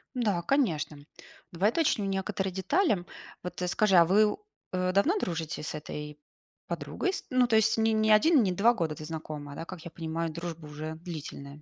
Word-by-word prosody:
Да, 210 -8 +1
конечно. 170 - 0 0.5
Давай 185 +5 +2
уточню 290 -6 +1
некоторые 195 -1 -2
детали. 195 - +1 0.4
Вот 180 - -6
скажи, 195 +2 +3
а 170 - +8
вы, 210 +4 +4 0.4
э, 185 0 +1
давно 295 - +3
дружите 160 - -3
с 150 - -4
этой 150 0 -7 0.5
подругой? 380 - -2
С - - -4
ну, 255 -1 +3
то 230 - +2
есть 220 +1 +4
не 225 0 +3
не 215 0 +3
1, 260 +5 +6
не 190 - +1
2 210 +7 +4
года 165 -8 -2
ты 155 - -8
знакома, 150 -2 -6
да, 165 - -6
как 180 -2 -9
я 170 - -7
понимаю, 165 0 -3
дружба 170 -1 -6
уже 155 +1 -6
длительная? 150 -3 -8
180 Hz, 180 wpm, -29 LUFS, 160-215 Hz, 0.5 s, а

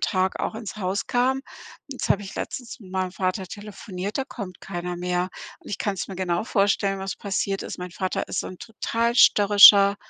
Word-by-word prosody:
Tag 185 -2 0
auch - - -2
ins 215 -2 -7
Haus 195 0 -2
kam. 260 +2 +1 0.5
Jetzt 270 -2 -4
habe 205 - +3
ich 195 - -9
letztens 245 -2 -6
mit 185 -2 -13
meinem 185 -1 -1
Vater 185 0 -2
telefoniert, 205 0 -6
da 265 - 0
kommt 195 -9 -8
keiner 175 -1 -5
mehr 180 +1 -1 0.3
und - - -14
ich 200 - -3
kann's 195 -3 -2
mir 195 - -6
genau 180 +1 -1
vorstellen, 195 -2 +1
was 190 -1 -4
passiert 195 -1 -2
ist. - - -6
Mein 180 0 -6
Vater 185 +1 -3
ist - - -3
so - - -6
'n 185 - -9
total 230 +1 -2
störrischer, 200 -2 +8
195 Hz, 195 wpm, -24 LUFS, 185-215 Hz, 0.5 s, störrischer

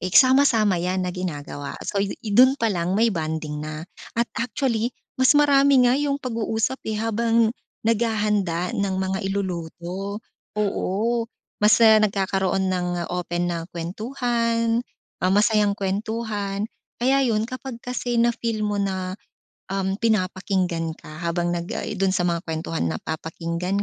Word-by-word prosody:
eh, 185 0 -3
sama-sama 255 -8 +5
yan 185 +1 0
na 180 - -1
ginagawa 145 -5 -5
so 200 - -2
i 200 - 0 0.2
dun 255 +5 +7
pa 230 - +3
lang 175 0 -1
may 230 +2 +4
bonding 155 -3 -3
na, 155 +1 -6 0.3
at 235 - +3
actually 235 -1 0 0.3
mas 260 - +7
marami 280 -3 +5
nga - - +4
'yung 285 -1 0
pag-uusap, 230 +1 -1
eh, 215 - -1
habang 225 0 +2 0.3
naghahanda 210 -6 +1
ng 200 -1 0
mga 190 0 -1
iluluto 190 +1 -4 0.4
oo, 210 +3 0 0.4
mas, 210 +2 +6
uh, 220 -1 +7
nagkakaroon 190 -2 +1
ng 180 -1 -1 0.2
open 175 -1 -1
na 170 -1 -2
kwentuhan, 230 +5 0 0.4
ah, 185 - +4
masayang 210 0 +3
kwentuhan, 205 0 -2 0.4
kaya 270 +3 +3
yun 220 -3 +1
kapag 255 -1 -6
kasi 245 -1 -2
na 235 - +4
feel 230 -2 -2
mo 205 - -1
na, 190 -1 -2 0.5
um, 195 0 0
pinapakinggan 185 -6 0
ka 155 +2 -11
habang 175 +1 0
nag 170 0 -4
ay - - -3
dun 195 -1 +2
sa 175 -1 +1
mga 170 -1 0
kwentuhan 160 - -2
napapakinggan 170 - -3
200 Hz, 140 wpm, -24 LUFS, 180-230 Hz, 0.5 s, dun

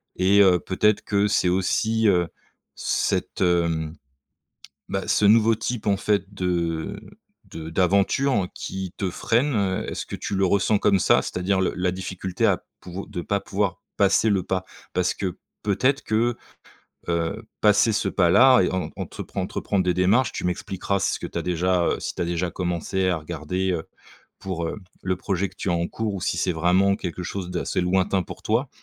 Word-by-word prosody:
et 95 +2 +4
heu, 90 -3 +5
peut-être 105 +5 +1
que 100 0 +1
c'est 95 -3 +2
aussi, 110 +5 +1
heu, 90 -4 +3 0.5
cette, - - -1
hem, 85 -3 +1 0.9
bah 95 0 -3
ce 105 - +3
nouveau 110 +2 +5
type 110 0 -4
en 100 - +3
fait 100 -1 0
de 90 0 -2 0.5
de 80 -4 -8
d'aventure 100 +5 +2
qui 95 -1 -5
te 95 - -1
freine. 120 +8 +1
Heu, 95 -2 0
est-ce - - -4
que - - -6
tu - - -4
le 95 0 +2
ressens 100 +3 +3
comme 100 -1 +3
ça? - - +4
C'est-à-dire 95 +2 -1
le 95 - +1
la 90 0 0
difficulté 95 0 -3
à - - +2 0.2
pouv 90 +2 -7
de 90 - -4
pas 100 +4 -1
pouvoir 100 -3 -2 0.2
passer 100 +2 +4
le 95 -3 +1
pas. 95 0 -2 0.3
Parce 90 0 +1
que 95 -3 -4 0.3
peut-être 130 +7 +1
que, 115 +2 +1 0.7
heu, 85 -1 -1 0.2
passer 105 +2 +5
ce 105 -2 0
pas 90 -3 +2
là 130 +2 +7
et - - 0
en 95 -1 -2
entrepren - - -5
entreprendre 100 -2 -1
des 90 -1 +1
démarches, 105 +7 +3
tu - - -5
m'expliqueras 95 +2 -2
si - - +1
ce - - -3
que - - -5
tu - - -6
as - - -2
déjà, 90 0 +1
heu, - - 0
si - - -4
tu - - -4
as - - +1
déjà 85 +1 -1
commencé 90 +1 -1
à 90 - +1
regarder, 85 +4 -3
heu, 80 - -2 0.6
pour, 90 -3 -3
heu, - - -4 0.3
le 95 0 -1
projet 95 +1 -1
que 95 - -20
tu 95 - -2
as - - +2
en 85 0 0
cours 110 -2 -3
ou 95 - -4
si - - -1
c'est 90 - +1
vraiment 90 +4 +3
quelque 90 -3 -5
chose 90 0 -4
d'assez 90 0 -1
lointain 95 +1 +1
pour - - -10
toi, 120 +5 0
95 Hz, 190 wpm, -24 LUFS, 90-100 Hz, 0.9 s, là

